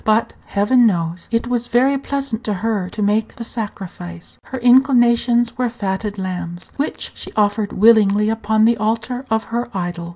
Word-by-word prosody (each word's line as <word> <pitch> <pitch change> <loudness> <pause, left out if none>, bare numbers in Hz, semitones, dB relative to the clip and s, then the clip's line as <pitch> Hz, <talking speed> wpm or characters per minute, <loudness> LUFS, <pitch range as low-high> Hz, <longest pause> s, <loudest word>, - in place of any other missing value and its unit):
But, 220 +1 +1
Heaven 235 +4 +3
knows, 170 -3 -2
it 230 0 0
was 240 -1 -2
very 255 +4 +3
pleasant 275 -4 -3
to 210 - 0
her 205 -5 -1
to 210 - -4
make 210 +2 0
the 240 - -7
sacrifice. 180 -6 -7
Her 265 - -6
inclinations 240 -1 +3
were 250 -1 +1
fatted 205 -2 -4
lambs, 180 -2 -5
which 285 - -3
she - - -9
offered 205 0 0
willingly 210 -1 +4
upon 220 0 +1
the 235 0 +3
altar 230 +4 -2
of 220 0 +1
her 240 +1 -2
idol. 175 -1 -4
220 Hz, 165 wpm, -19 LUFS, 200-240 Hz, -, willingly